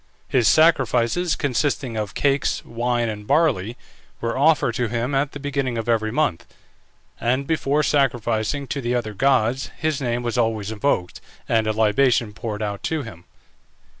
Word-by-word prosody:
His 125 -4 +2
sacrifices, 155 +1 +3
consisting 135 -2 -1
of 105 -1 -4
cakes, 140 -1 0
wine, 120 0 -1
and 105 -1 -6
barley, 130 - +1 0.4
were 115 0 -2
offered 145 -3 +3
to 120 +1 -1
him 120 +4 -2
at 135 +1 0
the 145 - -7
beginning 140 -4 -2
of 115 - -4
every 110 -2 +1
month; 145 - -1 0.7
and 130 +4 0
before 150 -1 +1
sacrificing 125 -2 0
to 140 - -2
the 120 0 -1
other 110 -3 -2
gods 130 +1 +1
his 155 -2 -1
name 120 -1 -1
was 120 +1 -1
always 110 -3 0
invoked, 105 -5 -1 0.3
and 110 -1 +1
a - - +2
libation 110 +1 +2
poured 110 0 -5
out 100 -1 -4
to 160 -3 -2
him. 90 -8 -11
120 Hz, 160 wpm, -22 LUFS, 110-140 Hz, 0.7 s, sacrifices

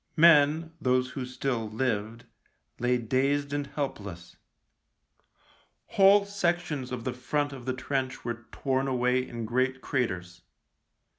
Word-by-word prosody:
Men, 160 0 +5
those 125 -1 +2
who 130 -1 -5
still 125 -3 -2
lived, 110 -1 -2 0.5
lay 125 +1 +2
dazed 140 +5 0
and 145 -1 -2
help 140 -3 -3
less. 85 -4 -10 1.5
Whole 200 +1 +6
sections 175 -9 -1
of 125 -2 -4
the 130 - -2
front 145 +3 -1
of 130 -3 -9
the 130 - +1
trench 130 -1 -3
were 120 -1 -5
torn 135 0 -1
away 125 -1 +2
in 115 -1 -5
great 130 +3 0
craters. 90 -10 -2
130 Hz, 130 wpm, -28 LUFS, 120-145 Hz, 1.5 s, Whole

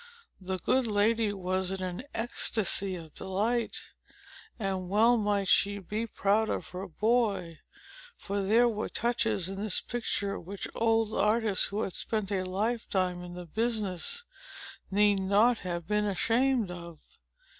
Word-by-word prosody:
The 190 0 -2
good 255 +7 +1
lady 215 +1 +2
was 185 -1 -1
in 190 -1 -3
an 180 +3 -4
ecstasy 215 -4 0
of 160 -3 -10
delight. 215 +5 -1 0.8
And 190 -4 -3
well 225 +5 +5
might 205 -3 0
she 200 +2 +4
be 210 +4 -4
proud 215 +1 +1
of - - -3
her 185 +2 -6
boy; 205 -4 0 0.6
for 200 0 -3
there 225 +5 +4
were 215 -2 -2
touches 225 -5 0
in 195 +1 -5
this 210 -3 +2
picture, 205 -4 -2
which 195 +3 -6
old 225 -1 +1
artists, 215 -2 +3
who 205 +2 -2
had 190 - -4
spent 215 -3 -2
a 195 -2 +1
lifetime 185 -2 -1
in 175 0 -8
the 180 0 -7
business, 220 - -1 0.7
need 205 0 +3
not 210 +5 +3
have 175 -2 -4
been 210 0 +1
ashamed 230 +2 +1
of. 170 -3 -9
205 Hz, 145 wpm, -29 LUFS, 185-225 Hz, 0.8 s, well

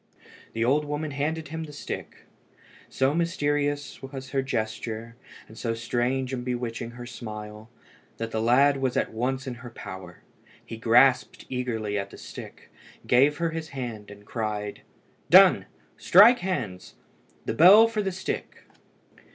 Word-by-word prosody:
The 115 0 0
old 145 +5 +3
woman 150 +1 -3
handed 150 +2 -3
him 160 +1 -5
the 150 - -11
stick. 145 - -7 0.6
So 135 +2 +1
mysterious 145 -3 -1
was 135 -1 -8
her 135 -1 +1
gesture, 115 -2 -4 0.3
and 110 - -14
so 115 0 -2
strange 125 +3 -1
and 125 -1 -3
bewitching 120 -1 -4
her 120 - -7
smile, 105 -2 -8 0.5
that 115 0 -4
the 110 - -1
lad 135 +5 +4
was 130 -2 -1
at - - -1
once 130 +4 -2
in 130 - -4
her 120 - -8
power. 95 -6 -10 0.4
He - - -7
grasped 120 +3 +3
eagerly 115 -5 -2
at 100 0 -5
the - - -12
stick, - - -11 0.3
gave 140 +4 +4
her 170 -1 -1
his 160 -1 -5
hand, 115 -5 -6
and 105 0 -13
cried 105 -2 -4 0.5
"Done! - - +7 0.3
strike 225 +7 +7
hands! 120 - -4 0.5
The - - -1
bell 195 +7 +8
for 225 -2 -2
the 195 -2 -2
stick!" 185 +1 -5
125 Hz, 150 wpm, -26 LUFS, 115-145 Hz, 0.6 s, bell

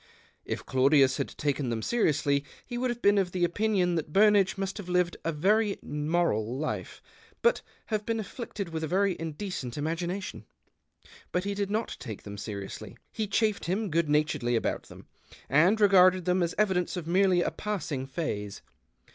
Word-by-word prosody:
If - - -4
Claudius 135 0 +4
had - - -1
taken 140 -3 -1
them 115 -2 -2
seriously, 145 -10 +1 0.2
he 245 - -6
would 250 +1 0
have 240 0 -4
been 205 0 +5
of 180 -2 -1
the 180 -1 0
opinion 190 -1 +1
that 160 -3 -2
Burnage 205 0 +4
must 195 0 -3
have 185 -3 -7
lived 180 -1 +1
a 165 - 0
very 200 +7 +2
moral 150 -7 0
life, 155 +2 -4 0.4
but 475 +1 +3 0.2
have 215 -2 -2
Ijeen 225 -1 0
afflicted 215 -3 -5
with 160 -1 -4
a - - -1
very 190 +2 +2
indecent 160 - -5
imagina 170 +5 -2
tion. - - -8 0.9
But 180 - 0
he 200 0 -2
did 200 -1 -2
not 220 +3 -2
take 110 -3 -7
them 100 -1 -8
seriously; 100 -1 -7
he 215 -1 -2
chaffed 210 +1 +1
him 195 +2 -1
good 165 -1 +1
naturedly 150 -5 +1
about 115 - -1
them, - - -13 0.4
and 175 +10 +4
regarded 185 -3 +5
them 180 0 +2
as 170 0 -1
evidence 190 -4 +1
of 175 - -4
merely 180 +1 +3
a - - -1
passing 155 -11 -3
phase. 105 - -4
180 Hz, 175 wpm, -28 LUFS, 150-200 Hz, 0.9 s, been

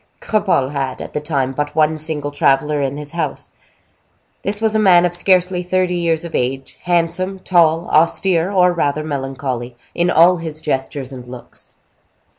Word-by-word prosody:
Cropole 190 -11 0
had, 135 -3 -3
at - - -8
the 150 - -2
time, 140 -4 -1
but 145 +2 -4
one 155 0 +3
single 155 -2 -2
traveler 145 +1 +1
in 140 +1 -2
his 150 -1 -7
house. 170 0 -4 0.9
This 205 +1 -2
was 220 -1 +1
a 220 - +2
man 180 -4 +5
of 175 - -1
scarcely 180 0 +2
thirty 180 0 0
years 170 -1 0
of 170 - -8
age, 130 +2 -3
handsome, 175 +2 0
tall, 170 -2 +2
austere, 170 +2 +2
or 180 -2 +3
rather 155 -2 -1
melancholy, 135 -4 -4 0.2
in 175 +1 +1
all 180 +1 +5
his 160 -2 -6
gestures 135 -2 -3
and 125 -2 -10
looks. 125 -1 -12
160 Hz, 165 wpm, -18 LUFS, 140-180 Hz, 0.9 s, man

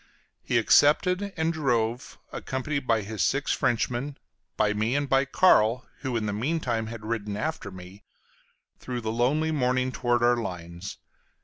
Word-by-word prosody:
He - - 0
accepted, 180 +7 +4
and 160 +1 +1
drove, 125 -5 -1
accompanied 135 +1 -3
by 115 -2 +2
his 105 -1 -2
six - - +1
Frenchmen, 125 +4 -1 0.4
by 105 -1 +2
me 110 +4 0
and 145 0 0
by 135 0 +3
Carl 125 -7 +3
(who 130 -4 -2
in 110 - -2
the 105 - -2
mean 140 +11 -1
time 115 -6 -2
had 110 -1 -8
ridden 105 -2 -3
after 130 -3 -3
me) 95 +2 -12 0.8
through 125 -1 -5
the 110 -1 -2
lonely 140 +8 +1
morning 130 -3 +1
towards 120 -1 0
our 120 0 +4
lines. 90 -3 -6
120 Hz, 155 wpm, -26 LUFS, 110-140 Hz, 0.8 s, accepted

